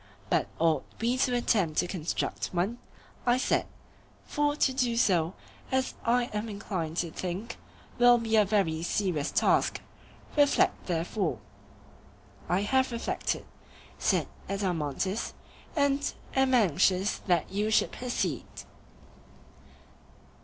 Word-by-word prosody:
But - - +2
ought 160 -1 +2 0.2
we 235 +2 +1
to 255 -1 +2
attempt 195 -9 +1
to - - +3
construct 175 -3 -2
one? 195 +7 -1 0.4
I 245 -1 +3
said; 255 - +1 0.6
for 290 0 0
to 270 -3 +2
do 245 -3 +1
so, 180 -6 +2 0.4
as 260 0 +1
I 245 +1 +3
am 210 +2 -2
inclined 185 -6 -4
to 170 -2 -1
think, 190 +8 -5 0.4
will 245 0 +7
be 225 -1 0
a 215 - +6
very 190 -6 +1
serious 175 -4 0
task. - - +2 0.6
Reflect 290 -2 +3
therefore. 170 - -1 1.1
I 180 +2 +2
have 260 +4 +2
reflected, 235 0 -2 0.5
said - - +1 0.2
Adeimantus, 190 - -2 0.4
and 285 -1 +2 0.2
am 265 -1 +4
anxious 190 - +3
that 175 -4 +2
you 205 +2 0
should 220 - +3
proceed. 195 - -2
205 Hz, 115 wpm, -29 LUFS, 175-245 Hz, 1.1 s, will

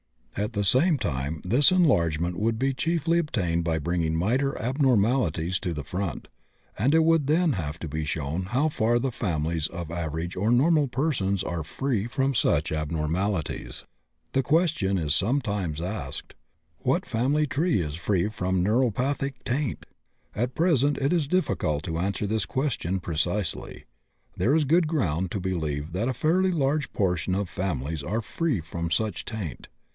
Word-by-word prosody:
At 105 +1 -2
the 100 - 0
same 145 - +4
time 75 - -3
this 125 - +5
enlargement 85 - +2
would 110 +1 +1
be 135 +3 +1
chiefly 165 +4 +1
obtained 90 - 0
by 80 -2 +1
bringing 80 0 0
minor 125 +11 +1
abnormalities 110 - +1
to 90 -3 -3
the 75 -2 -4
front, 90 +3 -4 0.5
and 135 +9 +3
it 160 - +5
would 165 -3 +3
then 160 +1 +3
have 80 -5 -3
to 80 - -5
be 80 +1 -3
shown 80 +3 -2
how 130 +10 +1
far 120 -4 +2
the 130 +2 -1
families 80 -6 -1
of 85 -2 -7
average 85 +1 -3
or 100 +4 0
normal 145 +4 +4
persons 120 - 0
are 85 -3 -3
free 115 - -2
from 135 +2 0
such 85 - +2
abnormalities. 80 +3 -2 0.5
The 135 - +2
question 145 - +2
is 75 -4 +1
sometimes 100 - 0
asked: 95 +6 -4 0.5
What 140 +9 0
family 130 +6 +1
is 140 - 0
free 90 +4 0
from 95 -4 -1
neuropathic 130 +5 +1
taint? 130 +1 -2 0.5
At 120 +4 -2
present 145 -4 +3
it 140 +4 +1
is 165 -5 +1
difficult 100 - 0
to 80 -1 -3
answer 100 +3 -1
this 110 0 0
question 110 - -1
precisely. 85 +2 -2 0.5
There 135 +6 +2
is 160 - +3
good 165 +4 +3
ground 95 - 0
to 100 - -2
believe 80 -5 -2
that 95 +7 -1
a - - 0
fairly 185 +7 +2
large 150 -2 0
proportion 90 -2 0
of 100 -2 -2
families 80 -5 -3
are 105 +11 -2
free 135 - -1
from 85 +1 -4
such 105 +4 -1
taint. 100 - -5
105 Hz, 160 wpm, -26 LUFS, 85-135 Hz, 0.5 s, this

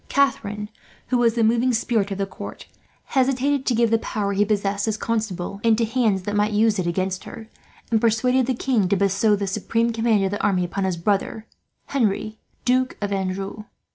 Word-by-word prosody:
Catharine, 210 -7 0 0.4
who 250 - +2
was 235 -1 +3
the 230 - +2
moving 235 +3 +3
spirit 220 -3 0
of 195 - -4
the 200 - 0
court, 190 - -9 0.5
hesitated 270 +1 +1
to 245 - +2
give 230 -1 +2
the 225 - +3
power 200 -2 -2
he 200 +1 +3
possessed, 205 0 0
as 220 -1 0
Constable, 200 -4 -3
into 230 0 +3
hands 220 -5 +1
that 205 +2 -3
might 210 +1 +1
use 215 -1 +3
it 175 - -1
against 185 +2 -2
her; 220 -1 -9 0.4
and 220 -1 +3
persuaded 250 +3 +2
the 260 - 0
king 230 -7 +1
to 200 - +3
bestow 200 +2 +2
the 200 0 -2
supreme 230 +4 0
command 225 -3 +2
of 190 - -1
the 205 - -3
army 185 -3 +2
upon 195 +2 -2
his 185 -2 -1
brother, 205 +4 -1 0.4
Henri, 215 -4 -1 0.3
Duke 255 +1 +1
of 205 -1 -2
Anjou. 195 +2 -3
215 Hz, 195 wpm, -23 LUFS, 195-235 Hz, 0.5 s, was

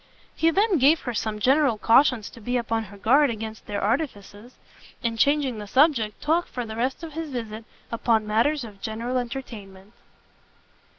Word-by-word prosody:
He 325 - +3
then 390 0 +2
gave 295 +5 +4
her 245 - -4
some 215 0 -2
general 265 0 +3
cautions 230 0 +3
to 230 - -14
be 245 +3 -1
upon 225 -2 -2
her 205 0 -13
guard 275 +8 +4
against 220 -1 -6
their 205 -1 -3
artifices, 220 -2 -3 0.5
and 230 -1 -2
changing 280 -4 +2
the 210 - -7
subject, 255 -4 +2
talked, 325 +3 0
for 245 -1 -4
the 220 0 -7
rest 255 +7 -2
of 320 -2 -7
his 325 0 -5
visit, 225 -4 -6 0.3
upon 225 -1 +1
matters 240 +7 +1
of 205 -4 -11
general 235 +3 -2
entertainment. 215 -6 -8
235 Hz, 170 wpm, -24 LUFS, 220-280 Hz, 0.5 s, gave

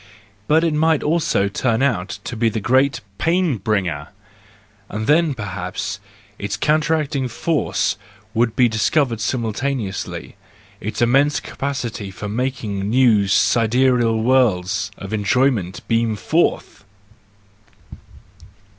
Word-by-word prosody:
But 160 +2 +4
it 165 -2 +1
might 160 0 +2
also 150 -10 +1
turn 115 +4 0
out 105 -10 -1
to 120 - -5
be 115 0 +2
the 110 - -3
great 130 +6 +2 0.2
pain 170 -5 +1
bringer! 90 -8 -1 0.8
—And 110 +1 -4
then, 155 0 +3
perhaps, 95 0 -4 0.4
its 100 0 -3
counteracting 150 -3 +1
force 150 +6 -1 0.4
would 115 0 +1
be 125 - +5
discovered 115 +1 +1
simultaneously, 115 -2 -3 0.4
its 110 +3 -2
immense 140 +5 +3
capacity 125 -7 -4
for 95 +2 -7
making 105 -4 -2
new 115 -4 +4
sidereal 115 +2 +2
worlds 100 -7 +2
of 100 +2 -7
enjoyment 110 -4 0
beam 115 -1 +1
forth! 95 0 0
115 Hz, 110 wpm, -20 LUFS, 105-140 Hz, 0.8 s, be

